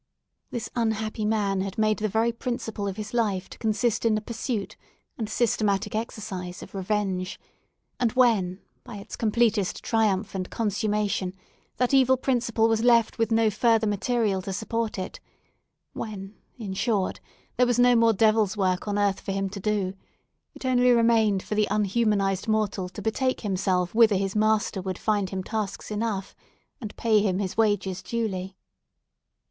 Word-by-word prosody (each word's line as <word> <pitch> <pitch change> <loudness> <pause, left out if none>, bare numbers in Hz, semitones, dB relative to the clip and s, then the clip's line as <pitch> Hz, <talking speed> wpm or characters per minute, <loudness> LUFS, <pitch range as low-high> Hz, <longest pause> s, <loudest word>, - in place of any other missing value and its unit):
This 225 -2 -4
unhappy 220 -2 -1
man 205 -3 +1
had 195 0 -4
made 215 -1 +2
the 215 - 0
very 225 +3 +2
principle 230 -4 -4
of 195 0 -4
his 215 +1 -6
life 205 -6 0
to - - -11
consist 220 +1 0
in 225 -2 +3
the - - +1
pursuit 225 -1 -4 0.4
and 220 -3 -4
systematic 210 -3 0
exercise 200 -5 -5
of - - -13
revenge; 190 -2 -2 0.6
and 240 -3 +2
when, 210 -7 +2 0.2
by 240 -3 -9
its 200 - -8
completest 220 -3 +1
triumph 215 -3 +1
consummation 205 -3 -1 0.4
that 250 +1 +1
evil 260 -1 +5
principle 240 -3 +1
was 225 0 +1
left 235 -2 +4
with 225 0 +1
no 225 -1 +3
further 225 +1 +3
material 210 -1 0
to 195 - -5
support 225 +2 -2
it—when, 195 +1 -9 0.2
in 210 -5 -5
short, 200 -1 0 0.4
there 250 0 +4
was 245 -1 +1
no 245 0 +5
more 230 -1 +5
Devil's 215 -1 +2
work 185 -1 0
on 205 0 -1
earth 200 -1 +1
for 195 - -4
him 195 0 -2
to 200 - -6
do, 200 -2 -1 0.6
it - - -9
only 250 -1 +3
remained 230 -4 +3
for - - -4
the 210 0 +2
unhumanised 205 -2 +1
mortal 210 -4 0
to 180 - -9
betake 255 +4 0
himself 185 -3 0
whither 220 -2 +5
his 195 +1 -1
master 215 -2 +1
would 185 -1 -4
find 205 -3 0
him 190 -1 -4
tasks 215 -1 -4
enough, 210 -2 -3 0.4
and 215 -5 -8
pay 220 -2 +3
him 195 -3 +1
his 190 -2 -3
wages 200 -4 +1
duly. 190 -5 -3
215 Hz, 160 wpm, -26 LUFS, 195-230 Hz, 0.6 s, evil